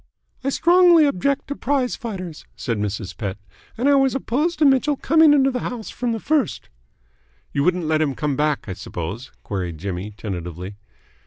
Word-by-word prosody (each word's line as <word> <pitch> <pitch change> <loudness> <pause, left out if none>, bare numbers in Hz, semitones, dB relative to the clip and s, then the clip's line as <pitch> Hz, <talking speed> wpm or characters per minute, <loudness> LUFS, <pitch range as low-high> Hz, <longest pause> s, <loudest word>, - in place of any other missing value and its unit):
"I 275 - 0
strongly 345 +1 +5
object 280 +2 0
to 285 - -2
prize 265 -2 0
fighters," 185 -9 -7
said 115 -4 -3
Mrs. 105 -1 -3
Pett, 100 -3 -4 0.4
"and 250 +4 +1
I 285 - +6
was 270 -2 +3
opposed 295 +7 0
to 305 - +3
Mitchell 275 +2 +4
coming 315 +3 +5
into 270 -2 +4
the 250 - -2
house 235 -2 -5
from 245 -1 -2
the 225 - -2
first." 290 -2 -1 0.8
"You 140 - +1
wouldn't 180 0 +1
let 155 0 +1
him 140 -4 0
come 150 -2 -1
back, 150 -2 0
I 95 - -3
suppose?" 95 +7 -6
queried 90 -5 -4
Jimmy 95 +3 -4
tentatively. 90 -1 -6
190 Hz, 175 wpm, -22 LUFS, -, 0.8 s, I